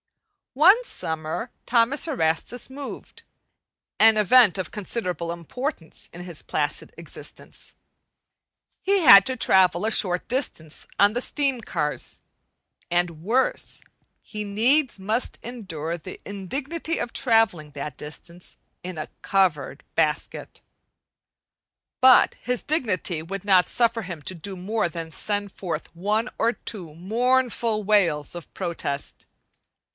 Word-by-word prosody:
One 375 - +6
summer 160 - -4
Thomas 245 +6 +2
Erastus 230 - -1
moved 275 +1 -9 0.8
an 220 0 +7
event 210 -1 +6
of 185 - -4
considerable 180 -5 -3
importance 170 - -6
in 175 - -9
his 175 -3 -6
placid - - -2
existence. - - -9 1.1
He 395 +1 +2
had 200 - +9
to 260 -1 -2
travel 185 -3 +4
a 220 - +1
short 180 -4 +2
distance 200 - -3
on 205 +1 +5
the 245 - -1
steam 275 -3 -1
cars; 150 -8 -3 0.7
and 175 -2 0
worse, 245 +7 0 0.4
he 210 -1 -6
needs 235 +5 +2
must 215 +6 -1
endure 175 -9 -5
the 185 +3 -9
indignity 275 - -4
of 240 - -4
travelling 225 - +2
that 145 -1 -6
distance 170 +4 -10 0.3
in 180 -2 -6
a 155 - -4
covered 185 -7 0
basket. - - -1 1.4
But 255 0 +7
his 250 -1 -1
dignity 210 - 0
would 195 +4 -6
not 185 -3 +5
suffer 230 -1 +1
him 175 -5 -7
to 185 - -4
do 190 +3 -6
more 195 +1 -1
than 165 0 -6
send 205 +4 -3
forth 170 -4 -5
one 210 +6 0
or 235 - +3
two 180 -11 -9
mournful 230 +3 +1
wails 175 -9 +2
of 175 - -9
protest. 165 -6 -4
200 Hz, 120 wpm, -24 LUFS, 170-240 Hz, 1.4 s, had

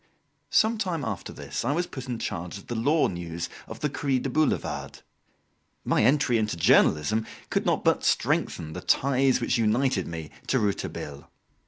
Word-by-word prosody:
Some 220 0 +3
time 170 -9 -1
after 100 -5 -4
this - - -5
I 130 +5 +1
was 175 +3 0
put 130 -6 -8
in 120 - -2
charge 90 -4 -4
of 100 - -13
the - - -5
law 145 +8 +3
news 85 -1 -5 0.2
of 110 - -9
the 150 - +2
"Cri 140 -2 0
du 130 +1 -3
Boulevard." 155 +3 -1 0.8
My - - +2
entry 125 -1 +3
into 105 -5 -1
journalism 85 +7 +3 0.2
could - - 0
not - - +1
but - - +2
strengthen 80 -1 0
the - - -6
ties 135 -1 +3
which 120 0 0
united 110 -2 +1
me 80 -2 -6 0.2
to 130 - +2
Rouletabille. 95 - -3
115 Hz, 170 wpm, -26 LUFS, 90-135 Hz, 0.8 s, Some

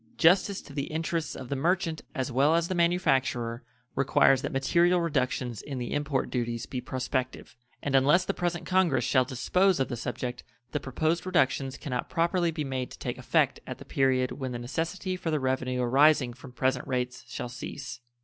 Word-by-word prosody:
Justice 185 +4 +4
to 145 - -12
the 140 0 -2
interests 165 +1 -2
of 125 - -8
the 140 - -1
merchant 165 +2 0
as 130 -2 -2
well 140 +6 +4
as 170 0 +1
the 185 - -2
manufacturer 135 -9 +1 0.3
requires 135 0 +4
that - - -3
material 170 +6 +3
reductions 130 - -1
in 140 -2 -6
the 120 -1 -4
import 145 -2 -1
duties 120 -1 -2
be 130 -2 -5
prospective; 130 0 -3 0.3
and 140 - -2
unless 145 +7 +5
the - - -1
present 175 -1 -2
Congress 185 -9 +2
shall 130 0 +3
dispose 180 +8 +2
of 135 - 0
the 120 - -2
subject 125 +1 -4 0.3
the 150 - -1
proposed 155 +5 -1
reductions 135 -7 +1
can 140 - -7
not 125 - -2
properly 170 0 +1
be 160 -2 -3
made 130 -3 -3
to - - -11
take - - -4
effect - - +2
at - - -5
the - - -12
period 130 -2 +1
when 130 0 -4
the - - -3
necessity 165 +10 -3
for 180 -2 -4
the 155 -1 +1
revenue 130 -1 -1
arising 135 0 +4
from 130 +1 -12
present 130 0 0
rates 125 -1 -2
shall - - -5
cease. 125 +2 -7
135 Hz, 190 wpm, -28 LUFS, 125-165 Hz, 0.3 s, unless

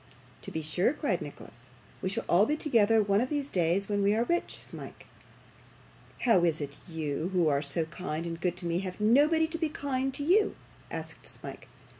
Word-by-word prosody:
'To - - -5
be 160 - -4
sure,' 175 - +1
cried - - -1
Nicholas; - - -10 0.3
'we 185 - -1
shall 225 +4 -1
all 195 +5 +5
be 300 - +1
together 225 -7 +4
one 200 +1 +2
of 255 - -1
these 290 -2 -2
days 180 +2 +1
when 205 -1 0
we 200 +1 +3
are 230 - +2
rich, 345 +7 -1
Smike.' - - -9 1.2
'How 225 -8 +4
is 165 -2 +2
it 145 -2 -4 0.2
that - - -12
you, 160 +1 -2
who 175 -3 +3
are 140 -1 +2
so 150 +3 -1
kind 160 0 -4
and 165 0 -5
good 180 -1 0
to 180 - -3
me, 170 +1 0
have 185 0 -5
nobody 290 +9 +4
to 325 +1 -3
be 320 -2 +1
kind 270 -2 -2
to 285 - -1
you?' 390 +8 +3 0.3
asked - - -6
Smike. - - -9
200 Hz, 205 wpm, -29 LUFS, 170-270 Hz, 1.2 s, all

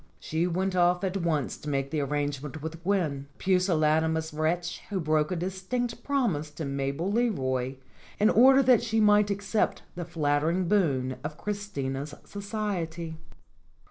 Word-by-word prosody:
She 160 +3 -1
went 185 +2 -1
off 180 +1 +3
at 190 0 0
once 160 -7 -1
to 150 - -7
make 135 -1 -1
the 155 - 0
arrangement 145 +1 -3
with 160 +1 -6
Gwen 165 -7 0
a - - -29
pusillanimous 160 -4 +2
wretch 170 +3 -1
who 200 -3 -1
broke 155 -1 +1
a - - 0
distinct 190 +7 -3
promise 225 - 0
to 150 +1 -6
Mabel 140 +6 -2
Leroy 135 - 0 0.4
in 215 +2 +5
order 265 +4 +7
that 250 -2 +5
she 225 -1 0
might 210 -1 +5
accept 200 +2 0
the 175 - -5
flattering 160 +2 0
boon 135 -10 +1
of 150 0 -5
Christina's 150 -9 -4
society. 190 -6 -4
170 Hz, 145 wpm, -28 LUFS, 150-200 Hz, 0.4 s, order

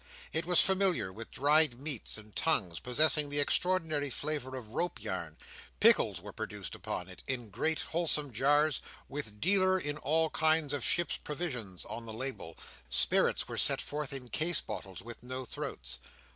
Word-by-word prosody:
It 165 +2 0
was 180 -1 +7
familiar 190 - +3
with 115 +2 -8
dried 145 -2 +3
meats 140 -7 0
and 105 -1 -13
tongues, 95 - 0
possessing 150 +4 +4
an 145 - +2
extraordinary 155 -2 +1
flavour 135 -1 -3
of 120 -5 -8
rope 175 +5 -2
yarn. 95 -7 -5 0.4
Pickles - - +4
were - - -10
produced - - -6
upon 90 - -4
it, 95 - -11
in 120 -5 -3
great 155 +9 0
wholesale 160 -3 -1
jars, 145 +6 +2 0.3
with 125 -7 -6
"dealer 190 - +3
in 145 -3 -3
all 160 +2 +2
kinds 155 -2 +2
of 140 -4 -2
Ships' 175 -3 +2
Provisions" 125 - -5
on 115 0 -7
the 110 - -5
label; 115 -9 -5 0.3
spirits - - +2
were - - -3
set - - +7
forth 150 -1 -4
in 130 -3 -4
case 165 +6 +1
bottles 95 -3 -7
with 120 0 -9
no 130 +1 -5
throats. - - -5
145 Hz, 165 wpm, -31 LUFS, 115-160 Hz, 0.4 s, was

